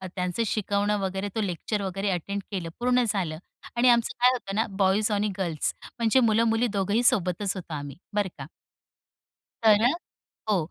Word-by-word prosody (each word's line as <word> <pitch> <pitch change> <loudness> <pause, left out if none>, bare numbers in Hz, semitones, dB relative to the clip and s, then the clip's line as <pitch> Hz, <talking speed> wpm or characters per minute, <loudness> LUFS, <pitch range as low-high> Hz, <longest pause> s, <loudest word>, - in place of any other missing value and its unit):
त्यांचं 180 +4 -1
शिकवणं 205 0 0
वगैरे, 195 +1 -2
तो 220 - 0
लेक्चर 200 +2 -2
वगैरे 195 +1 -2
अटेंड 200 +3 -3
केलं 180 -4 -3
पूर्ण 250 0 +3
झालं 185 -7 -1 0.4
आणि 245 +1 +4
आमचं 235 +2 +3
काय 250 - +6
होतं 195 -6 -4
ना, 220 - +2
बॉईज 195 +2 +2
आणि 205 0 +1
गर्ल्स 170 -5 -1 0.3
म्हणजे 230 +3 +4
मुलं-मुली 230 0 +3
दोघंही 205 +5 +1
सोबतच 195 -2 +2
होतो 175 -3 -7
आम्ही, 145 -2 -6 0.2
बरं 205 -2 +1
का 135 - -7 1.2
तर 215 -1 +6
अ, - - +6 0.6
हो. 175 -5 +1
200 Hz, 165 wpm, -26 LUFS, 185-225 Hz, 1.2 s, काय